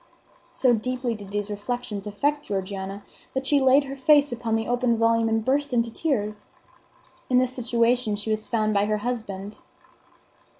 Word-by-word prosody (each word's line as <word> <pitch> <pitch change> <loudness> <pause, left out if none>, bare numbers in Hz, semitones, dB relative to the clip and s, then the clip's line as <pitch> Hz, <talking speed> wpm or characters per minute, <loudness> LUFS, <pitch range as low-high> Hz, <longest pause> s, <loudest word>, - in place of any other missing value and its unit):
So 255 -2 +3
deeply 250 +2 -1
did 205 -3 -9
these 205 +1 -3
reflections 210 -1 -4
affect 290 +8 -1
Georgiana 195 0 -4 0.3
that 265 0 -1
she 285 0 +3
laid 265 +2 +5
her 275 0 -6
face 290 +1 +4
upon 230 -2 -1
the 225 0 -1
open 245 -1 +1
volume 230 0 +3
and 225 0 0
burst 285 +1 +1
into 230 -1 +1
tears. 210 -10 -2 0.8
In 250 - +4
this 255 0 +2
situation 235 -2 +1
she 210 +2 -3
was 215 0 -2
found 215 -2 +1
by 200 0 +3
her 215 0 +1
husband. 210 -3 -5
230 Hz, 165 wpm, -25 LUFS, 210-255 Hz, 0.8 s, laid